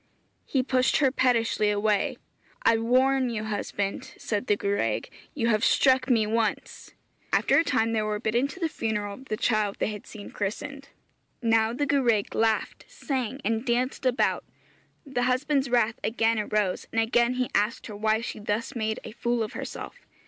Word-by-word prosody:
He 265 Hz, -2 st, +1 dB
pushed 255 Hz, 0 st, +2 dB
her 270 Hz, -3 st, +3 dB
pettishly 230 Hz, -5 st, +2 dB
away. 210 Hz, 0 st, +1 dB, 0.5 s
'I 225 Hz, -, +5 dB
warn 255 Hz, +2 st, +3 dB
you, 220 Hz, -2 st, -3 dB
husband,' 205 Hz, -2 st, -3 dB
said 210 Hz, +3 st, -3 dB
the 205 Hz, -, +4 dB
gwraig; 200 Hz, -, -1 dB, 0.2 s
'you 235 Hz, -5 st, +1 dB
have 215 Hz, -1 st, +2 dB
struck 260 Hz, -1 st, +4 dB
me 225 Hz, -4 st, +4 dB
once.' 220 Hz, 0 st, -2 dB, 0.4 s
After -, -, +4 dB
a -, -, +3 dB
time 225 Hz, -6 st, +1 dB
they 220 Hz, -, +1 dB
were 215 Hz, 0 st, -2 dB
bidden 235 Hz, +4 st, +1 dB
to 335 Hz, -, -10 dB
the 335 Hz, -, +1 dB
funeral 210 Hz, -8 st, -3 dB
of 260 Hz, +6 st, -12 dB
the 215 Hz, -, -3 dB
child 215 Hz, -3 st, +1 dB
they -, -, 0 dB
had 210 Hz, -2 st, -8 dB
seen 210 Hz, -2 st, -10 dB
christened. 275 Hz, +7 st, -5 dB, 0.5 s
Now 225 Hz, -1 st, +3 dB
the 275 Hz, +5 st, -1 dB
gwraig 245 Hz, -8 st, +1 dB
laughed, 225 Hz, -1 st, 0 dB
sang, 260 Hz, -1 st, -3 dB
and 225 Hz, +1 st, 0 dB
danced 255 Hz, +2 st, 0 dB
about. 250 Hz, 0 st, +1 dB, 0.6 s
The 270 Hz, -3 st, -2 dB
husband's 275 Hz, +1 st, +1 dB
wrath 235 Hz, -2 st, +2 dB
again 225 Hz, 0 st, +1 dB
arose, 210 Hz, -3 st, -1 dB
and 225 Hz, -, 0 dB
again 235 Hz, +2 st, +2 dB
he 250 Hz, -1 st, -1 dB
asked 215 Hz, +4 st, 0 dB
her 210 Hz, -, -7 dB
why 220 Hz, +1 st, +1 dB
she 230 Hz, -, -5 dB
thus 210 Hz, +5 st, -3 dB
made 220 Hz, -1 st, -1 dB
a -, -, -8 dB
fool 235 Hz, +1 st, -1 dB
of 215 Hz, -, -6 dB
herself. -, -, -7 dB
230 Hz, 175 wpm, -26 LUFS, 215-255 Hz, 0.6 s, I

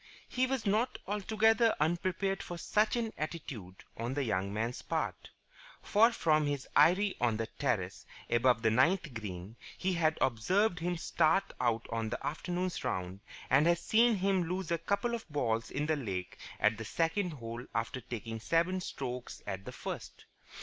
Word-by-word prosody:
He 255 Hz, +1 st, +1 dB
was 265 Hz, -3 st, -2 dB
not 220 Hz, +5 st, +1 dB
altogether 220 Hz, +3 st, +3 dB
unprepared 185 Hz, +4 st, 0 dB
for 175 Hz, -, -6 dB
such 210 Hz, +6 st, +2 dB
an 230 Hz, -2 st, -1 dB
attitude 140 Hz, -, -6 dB
on 120 Hz, +3 st, -3 dB
the 145 Hz, -, 0 dB
young 100 Hz, -4 st, -1 dB
man's 115 Hz, +4 st, -2 dB
part: -, -, -3 dB, 0.5 s
for 225 Hz, +3 st, +5 dB
from 155 Hz, -8 st, +2 dB
his 145 Hz, -2 st, -2 dB
eyrie 185 Hz, +7 st, +5 dB
on 115 Hz, -3 st, +2 dB
the 115 Hz, -, -1 dB
terrace 105 Hz, -7 st, -2 dB, 0.2 s
above 120 Hz, 0 st, +3 dB
the 110 Hz, -, +4 dB
ninth 155 Hz, -, +3 dB
green 105 Hz, -1 st, -6 dB, 0.2 s
he 190 Hz, 0 st, 0 dB
had 160 Hz, -2 st, +2 dB
observed 175 Hz, -, +2 dB
him 175 Hz, +1 st, -1 dB
start 165 Hz, +3 st, +2 dB
out 115 Hz, -2 st, +1 dB
on 115 Hz, -1 st, -1 dB
the 120 Hz, -, -4 dB
afternoon's 180 Hz, +3 st, -2 dB
round 95 Hz, +1 st, -3 dB, 0.3 s
and 140 Hz, +5 st, +4 dB
had 170 Hz, 0 st, +4 dB
seen 230 Hz, +5 st, +4 dB
him 190 Hz, -2 st, +1 dB
lose 180 Hz, 0 st, -3 dB
a 170 Hz, -, +1 dB
couple 200 Hz, +7 st, 0 dB
of 230 Hz, -6 st, -5 dB
balls 115 Hz, -6 st, 0 dB
in 150 Hz, -, -2 dB
the 155 Hz, 0 st, +2 dB
lake 95 Hz, -10 st, -4 dB, 0.2 s
at 105 Hz, +1 st, +3 dB
the 115 Hz, -, -5 dB
second 170 Hz, -, 0 dB
hole 115 Hz, -3 st, -6 dB
after 115 Hz, +3 st, -2 dB
taking 115 Hz, -1 st, -5 dB
seven 170 Hz, +8 st, +1 dB
strokes 125 Hz, -6 st, -5 dB
at 95 Hz, -1 st, -5 dB
the -, -, -6 dB
first. -, -, -7 dB
155 Hz, 170 wpm, -32 LUFS, 115-190 Hz, 0.5 s, for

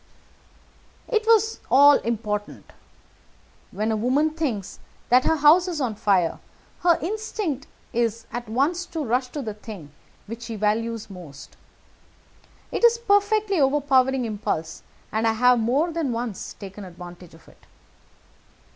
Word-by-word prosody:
"It 445 Hz, -2 st, 0 dB
was 445 Hz, -1 st, +3 dB
all 285 Hz, +2 st, +7 dB
important. 210 Hz, -2 st, -4 dB, 1.0 s
When 215 Hz, +2 st, -2 dB
a -, -, +1 dB
woman 260 Hz, +8 st, +1 dB
thinks 260 Hz, -, -3 dB, 0.3 s
that 250 Hz, +1 st, +5 dB
her 320 Hz, -, +3 dB
house 315 Hz, +5 st, +5 dB
is 340 Hz, -4 st, -3 dB
on 250 Hz, -6 st, -1 dB
fire, 195 Hz, -5 st, +1 dB, 0.4 s
her 345 Hz, -1 st, +4 dB
instinct 405 Hz, -, -3 dB, 0.3 s
is 230 Hz, -1 st, -1 dB
at 240 Hz, -2 st, -5 dB
once 310 Hz, +10 st, 0 dB
to 325 Hz, -3 st, -4 dB
rush 250 Hz, +2 st, 0 dB
to 280 Hz, +2 st, -6 dB
the 215 Hz, -3 st, -4 dB
thing 205 Hz, -8 st, -10 dB, 0.3 s
which 230 Hz, +2 st, -8 dB
she 230 Hz, -1 st, -6 dB
values 220 Hz, +2 st, -1 dB
most. 165 Hz, -7 st, -11 dB, 1.2 s
It -, -, -3 dB
is 470 Hz, 0 st, +6 dB
a -, -, -20 dB
perfectly 410 Hz, -3 st, +2 dB
overpowering 265 Hz, -2 st, +2 dB
impulse, 180 Hz, -7 st, -3 dB, 0.3 s
and 220 Hz, +1 st, 0 dB
I 225 Hz, -, +3 dB
have 250 Hz, +2 st, +4 dB
more 270 Hz, +10 st, +1 dB
than 320 Hz, -5 st, -2 dB
once 230 Hz, -4 st, -5 dB
taken 200 Hz, 0 st, -9 dB
advantage 175 Hz, -1 st, -11 dB
of 165 Hz, -, -20 dB
it. -, -, -21 dB
245 Hz, 140 wpm, -24 LUFS, 215-315 Hz, 1.2 s, all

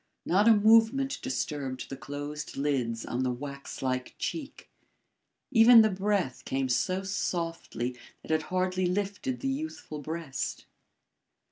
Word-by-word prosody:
Not 200 Hz, +5 st, +3 dB
a 230 Hz, -, +9 dB
movement 225 Hz, +6 st, +4 dB
disturbed 140 Hz, -, -3 dB
the 135 Hz, -, -6 dB
closed 145 Hz, +3 st, -6 dB
lids 125 Hz, -5 st, -1 dB
on 120 Hz, -, -2 dB
the 130 Hz, -, +1 dB
wax 140 Hz, +3 st, -6 dB
like 130 Hz, -1 st, -2 dB
cheek. 300 Hz, -4 st, -5 dB, 0.8 s
Even 230 Hz, -1 st, +9 dB
the 215 Hz, -, +2 dB
breath 190 Hz, -8 st, -1 dB
came 135 Hz, 0 st, -1 dB
so 185 Hz, +9 st, +1 dB
softly 165 Hz, -, -3 dB, 0.3 s
that -, -, -6 dB
it 155 Hz, 0 st, +3 dB
hardly 185 Hz, 0 st, +1 dB
lifted 205 Hz, +7 st, -2 dB
the 270 Hz, -, -1 dB
youthful 270 Hz, -, -4 dB
breast. 145 Hz, -2 st, -4 dB
170 Hz, 130 wpm, -29 LUFS, 135-210 Hz, 0.8 s, a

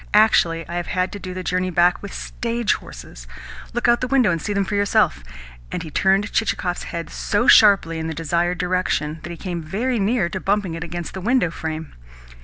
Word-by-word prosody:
Actually, 170 Hz, -6 st, +4 dB
I 170 Hz, +1 st, -4 dB
have 175 Hz, -, -3 dB
had 185 Hz, 0 st, -1 dB
to 205 Hz, -, -7 dB
do 185 Hz, -1 st, -7 dB
the 185 Hz, -, -4 dB
journey 185 Hz, +1 st, 0 dB
back 175 Hz, 0 st, +3 dB
with 200 Hz, -, -7 dB
stage 235 Hz, -1 st, -2 dB
horses! -, -, -10 dB, 0.4 s
Look 240 Hz, -, -1 dB
out 240 Hz, 0 st, +5 dB
of -, -, -18 dB
the 255 Hz, -, -2 dB
window, 255 Hz, -6 st, +3 dB
and 165 Hz, -2 st, -2 dB
see 205 Hz, -, -3 dB
them 200 Hz, -1 st, 0 dB
for 205 Hz, -, -5 dB
yourself." 200 Hz, -, +2 dB, 0.5 s
And -, -, -3 dB
he 160 Hz, -, -8 dB
turned 195 Hz, +5 st, +2 dB
Chichikov's 180 Hz, -5 st, -1 dB
head 170 Hz, -1 st, -5 dB
so 210 Hz, +3 st, 0 dB
sharply 195 Hz, -6 st, +6 dB
in 160 Hz, -, -3 dB
the 160 Hz, -, -4 dB
desired 170 Hz, +3 st, 0 dB
direction 180 Hz, -4 st, -1 dB
that 170 Hz, -, -8 dB
he 170 Hz, -, -7 dB
came 175 Hz, -2 st, -4 dB
very 225 Hz, +10 st, -2 dB
near 205 Hz, -1 st, +1 dB
to 190 Hz, +2 st, -4 dB
bumping 195 Hz, -2 st, 0 dB
it 165 Hz, 0 st, -5 dB
against 175 Hz, 0 st, -6 dB
the 190 Hz, -, -6 dB
window 235 Hz, -4 st, +2 dB
frame. 160 Hz, -1 st, -5 dB
185 Hz, 215 wpm, -21 LUFS, 170-205 Hz, 0.5 s, sharply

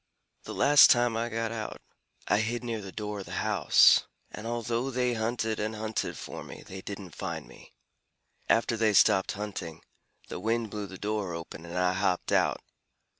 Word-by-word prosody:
"The -, -, -6 dB
last 145 Hz, +1 st, +7 dB
time 120 Hz, -1 st, +4 dB
I 115 Hz, +1 st, -1 dB
got 115 Hz, 0 st, -2 dB
out, 110 Hz, -2 st, -5 dB, 0.5 s
I 105 Hz, -, +3 dB
hid 120 Hz, +3 st, -2 dB
near 115 Hz, -3 st, -3 dB
the 95 Hz, -1 st, -8 dB
door 105 Hz, 0 st, -5 dB
of 95 Hz, -, -8 dB
the -, -, -8 dB
house, -, -, +5 dB, 0.2 s
and 110 Hz, -, -7 dB
although 120 Hz, +2 st, -2 dB
they 125 Hz, -1 st, 0 dB
hunted 110 Hz, -1 st, -1 dB
and 110 Hz, +1 st, -2 dB
hunted 110 Hz, 0 st, -3 dB
for -, -, -7 dB
me, -, -, -10 dB
they 95 Hz, 0 st, -8 dB
didn't 95 Hz, -4 st, -8 dB
find -, -, -5 dB
me. -, -, -16 dB, 0.7 s
After 115 Hz, 0 st, +3 dB
they 110 Hz, -1 st, +2 dB
stopped 95 Hz, +1 st, +4 dB
hunting, 100 Hz, -6 st, -6 dB, 0.4 s
the -, -, -6 dB
wind 115 Hz, -1 st, -1 dB
blew 105 Hz, -2 st, -4 dB
the 95 Hz, -, -10 dB
door 105 Hz, -4 st, -2 dB
open, 85 Hz, 0 st, -8 dB
and 85 Hz, +1 st, -6 dB
I 90 Hz, 0 st, +2 dB
hopped 95 Hz, -1 st, 0 dB
out." -, -, +2 dB
110 Hz, 180 wpm, -29 LUFS, 100-115 Hz, 0.7 s, last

